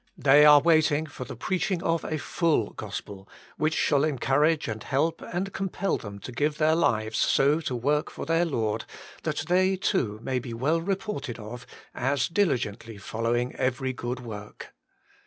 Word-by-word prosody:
They 145 +2 +6
are 150 -1 +9
waiting 160 -2 +3
for 130 -4 -8
the - - -8
preaching 185 - -1
of 165 -1 0
a 155 - -2
full 155 - 0
gospel, 95 -1 -7 0.3
which 155 +1 +1
shall 140 0 +2
encourage 150 +2 +2
and 110 -1 -4
help 155 +7 0
and 190 +2 -4
compel 195 0 -1
them 100 -2 -8
to 125 - -7
give 150 +5 0
their 155 0 +3
lives 110 -9 +1
so 145 +3 +3
to 130 -5 -3
work 145 +5 0
for - - -7
their 165 +1 +2
Lord, 115 -9 -1 0.4
that - - -2
they, 185 +2 +3
too, 125 - -1
may 130 -1 -1
be 120 -2 -7
well 155 +8 +1
reported 190 - -3
of 120 +3 -9 0.3
as 135 +1 0
diligently 120 - -1
following 115 +4 -2
every 130 +1 -1
good 125 0 -4
work. 105 -3 -9
140 Hz, 165 wpm, -27 LUFS, 120-165 Hz, 0.4 s, are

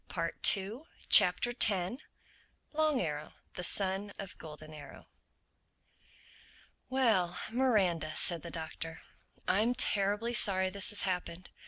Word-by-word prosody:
THE - - -5
TENTH 215 +10 +2 0.2
CHAPTER 180 +7 +5 1.2
LONG 305 -3 0
ARROW, 150 -3 -6 0.2
THE 180 - -7
SON 195 +2 +3
OF 195 -2 -9
GOLDEN 155 0 -12
ARROW 145 -2 -14 1.8
"WELL, 220 -10 0
Miranda," 190 - -1
said 170 -3 0
the 170 - -9
Doctor. 165 0 -8 0.5
"I'm 225 +5 0
terribly 205 +3 +1
sorry 190 -4 +4
this 200 +3 -1
has 205 - -1
happened. 180 -1 -5
190 Hz, 110 wpm, -30 LUFS, 170-220 Hz, 1.8 s, CHAPTER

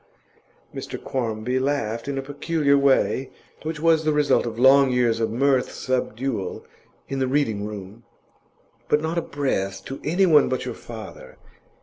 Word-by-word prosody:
Mr - - -6
Quarmby 120 0 -2
laughed 130 -4 -1
in 140 -1 -2
a 135 - -2
peculiar 145 +1 +1
way, 135 -1 +2 0.3
which 155 0 -4
was 160 0 +3
the 155 - +2
result 150 -4 +2
of 115 -1 -5
long 135 +2 +6
years 120 -2 +2
of 115 - 0
mirth 130 +2 +2
subdual 125 -4 -3 0.4
in 135 - -3
the 130 - +1
Reading 115 -7 0
room. 105 +1 -9 0.9
'But 150 - +3
not 165 +2 0
a - - -2
breath 100 -11 -2
to 135 - -6
anyone 165 -2 +4
but 130 - -2
your - - -4
father. - - -10
135 Hz, 150 wpm, -23 LUFS, 115-145 Hz, 0.9 s, long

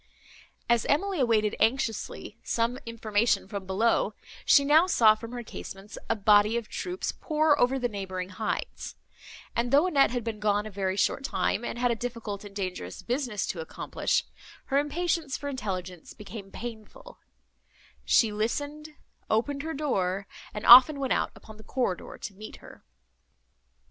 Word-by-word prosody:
As 235 -2 +2
Emily 375 +4 +1
awaited 220 -4 +2
anxiously 225 -2 -1
some 235 +2 -1
information 215 -3 0
from 200 -2 -6
below, 210 +1 +1 0.3
she 280 - +6
now 310 +5 +5
saw 225 -11 +6
from 225 +2 -9
her 245 -1 -6
casements 200 -1 -9
a 225 - +2
body 210 +1 +4
of 235 -2 -4
troops 360 - -4
pour 305 -2 +1
over 250 +2 +3
the 250 -2 0
neighbouring 190 -4 -5
heights; 210 +3 -4 0.6
and, 240 +1 0
though 285 +5 +5
Annette 290 -7 +4
had 245 -1 -3
been 225 -2 -4
gone 210 0 +1
a 215 - -7
very 190 -1 -2
short 270 - +1
time, 240 - -1
and - - -4
had 245 0 +1
a - - +1
difficult 230 -4 -5
and 205 -1 -11
dangerous 180 - -5
business 245 -5 -2
to 175 - -4
accomplish, 160 - -1 0.4
her 275 - +2
impatience 315 0 -1
for 285 - -5
intelligence 185 - -5
became 200 -1 -9
painful: 240 - -9 0.8
she 225 -3 +4
listened; 290 +8 -3 0.3
opened 275 +6 0
her 320 +2 -4
door; 195 -10 -1 0.3
and 210 - -6
often 260 +4 +9
went 270 -2 0
out - - 0
upon 220 -1 -13
the 215 - -14
corridor 240 -9 -3
to 200 - -7
meet 215 +3 -10
her. - - -15
230 Hz, 160 wpm, -27 LUFS, 205-275 Hz, 0.8 s, often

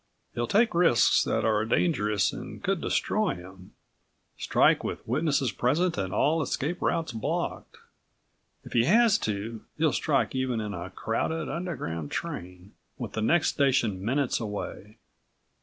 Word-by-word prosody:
He'll 120 0 -2
take 225 +3 +3
risks 170 -9 +4
that - - 0
are 110 -1 +2
dangerous 105 - +1
and - - -8
could - - 0
destroy - - 0
him, 95 +1 -13 0.6
strike - - +3
with - - -5
witnesses 140 -1 +1
present 160 +7 +1
and 95 -5 -3
all 150 +10 +2
escape 155 +4 -2
routes 165 -1 0
blocked. 110 -2 -3 0.9
If - - -11
he 120 -1 +4
has 225 - +5
to, 110 +2 -3 0.2
he'll 155 -1 +2
strike 145 -4 +1
even 130 -3 -1
in 105 -2 -4
a 90 +1 -6
crowded 150 +11 -2
Underground 85 - -4
train 90 +2 -6 0.2
with - - -5
the 110 - -2
next 165 +9 +3
station 120 -9 +1
minutes 130 +4 0
away. 105 0 -6
120 Hz, 140 wpm, -27 LUFS, 105-160 Hz, 0.9 s, has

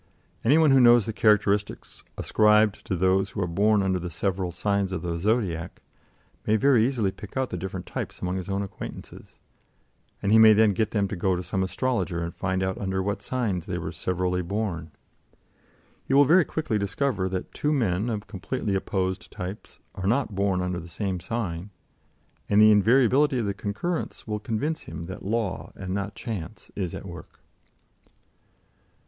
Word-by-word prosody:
Any 135 +7 +5
one 160 -3 +5
who 135 - +6
knows 120 -2 +6
the 110 - -3
characteristics 105 -1 +1
ascribed 105 -1 +3
to 95 - 0
those 95 +2 +2
who 100 - -4
are - - 0
born 100 +4 +2
under 95 -1 +1
the 90 0 -5
several 90 +2 -2
signs 100 +2 -1
of 90 -2 -4
the 85 -1 -2
Zodiac, 95 -5 -1 0.7
may 110 - +4
very 120 0 +4
easily 115 -8 0
pick 105 +5 -10
out 130 -1 -1
the - - -2
different 95 0 -5
types - - -5
among 90 +1 -2
his 95 +1 -5
own 100 +1 -1
acquaintances, 95 - -9 0.8
and 100 - -1
he 110 - +7
may 110 -1 +9
then 105 -1 +4
get 110 +3 0
them 100 -3 0
to 105 - -3
go 95 +1 +1
to 90 - -4
some 95 - -2
astrologer 95 -4 -1
and 85 0 -4
find 95 0 -1
out 95 0 -2
under 95 -1 -1
what 100 +1 -2
signs 110 -10 -2
they - - -2
were - - -4
severally 90 0 -1
born. 90 -3 -3 1.2
He 135 - +2
will 145 +1 +7
very 170 +3 +5
quickly 125 -9 -2
discover 100 -1 -1
that 95 -1 -5
two 150 - -1
men 110 -6 +1
of 105 -2 -3
completely 105 +2 -3
opposed 95 0 -2
types 90 +3 -7 0.2
are 95 - -4
not 120 0 +1
born 95 -1 0
under 90 -1 -2
the 85 - -9
same 95 +1 -3
sign, 95 -3 -4 0.8
and 105 - +4
the 110 0 +8
invariability 130 +6 +4
of 115 - 0
the 100 - -1
concurrence 105 - -4
will 105 -1 -3
convince 120 +9 -3
him - - -7
that 95 +3 -7
law, 105 -2 -2
and 95 -1 -5
not 100 +1 -3
chance, 110 -3 -7
is 90 -4 -3
at - - -8
work. 85 -4 -10
100 Hz, 180 wpm, -26 LUFS, 95-110 Hz, 1.2 s, may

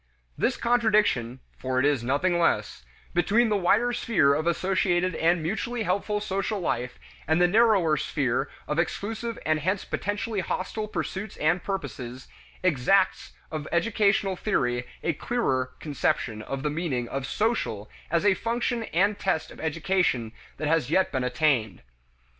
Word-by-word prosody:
This - - 0
contradiction 215 - +2 0.2
(for 130 0 -1
it 130 - +2
is 145 -5 +2
nothing 160 +8 +1
less) 165 - 0 0.3
between 215 +7 +3
the 210 - +2
wider 210 +6 +3
sphere 200 -12 +3
of 155 +3 -1
associated 185 0 +1
and 165 +1 +2
mutually 225 +7 -2
helpful 205 +2 0
social 200 +1 -2
life 125 -7 -2 0.3
and 160 +2 +3
the 180 - +5
narrower 200 -6 +4
sphere 135 -1 -1 0.2
of 150 +2 -1
exclusive 220 +6 -2
and 155 0 +2
hence 185 +5 -1
potentially 205 +1 -2
hostile 200 +4 -3
pursuits 200 -1 -4
and 160 +4 +1
purposes, 130 -10 -5 0.4
exacts 185 +4 +2 0.2
of 155 -2 -4
educational 200 +1 +2
theory 125 - 0 0.2
a 165 - +1
clearer 135 - -1
conception 125 -6 -1
of 135 +4 -5
the 150 - 0
meaning 145 -7 -2
of 135 +2 -4
"social" 210 - -1 0.2
as 170 +4 +1
a 205 - +6
function 235 +2 -1
and 200 +4 +1
test 190 -5 -1
of - - -13
education 160 -7 0 0.3
than 155 - -2
has 155 -4 +1
yet 185 +4 +2
been 130 - -1
attained. 125 - +1
175 Hz, 145 wpm, -26 LUFS, 140-205 Hz, 0.4 s, a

